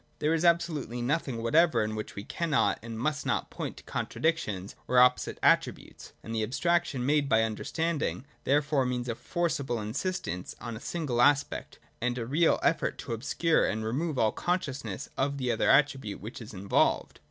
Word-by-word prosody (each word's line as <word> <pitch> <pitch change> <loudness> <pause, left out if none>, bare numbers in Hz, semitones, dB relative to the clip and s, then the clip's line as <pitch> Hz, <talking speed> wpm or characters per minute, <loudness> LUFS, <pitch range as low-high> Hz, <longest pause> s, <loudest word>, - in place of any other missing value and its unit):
There 155 +2 +1
is 165 0 0
absolutely 165 -8 +1
nothing 125 -2 -1
whatever 130 -1 +4
in 110 0 -2
which 110 0 -6
we 100 - -5
cannot 160 +5 0
and 115 0 -7
must 150 +3 -1
not - - -1
point - - -5
to - - -12
contradictions 110 - -2
or 125 - +1
opposite 125 0 +4
attributes; - - +1
and 115 - -6
the 110 - 0
abstraction 145 +2 0
made 145 0 +2
by 110 -2 +4
understanding 150 +6 -2 0.2
therefore 145 0 +2
means 125 -1 -2
a 120 - -1
forcible 140 -3 -2
insistance 105 - -3
on 120 -2 -6
a - - -7
single 140 -3 -1
aspect, 145 +2 +2 0.2
and 125 +1 0
a 115 - -3
real 155 +7 +3
effort - - +1
to - - -5
obscure 150 +8 +1
and 110 0 -2
remove 145 +6 -1
all 110 -3 +3
consciousness 140 - -3
of 140 +1 0
the 125 -2 0
other 115 - +1
attribute 135 -7 +3
which 115 +4 -8
is 115 - -9
involved. 100 0 +1
130 Hz, 175 wpm, -29 LUFS, 115-155 Hz, 0.2 s, whatever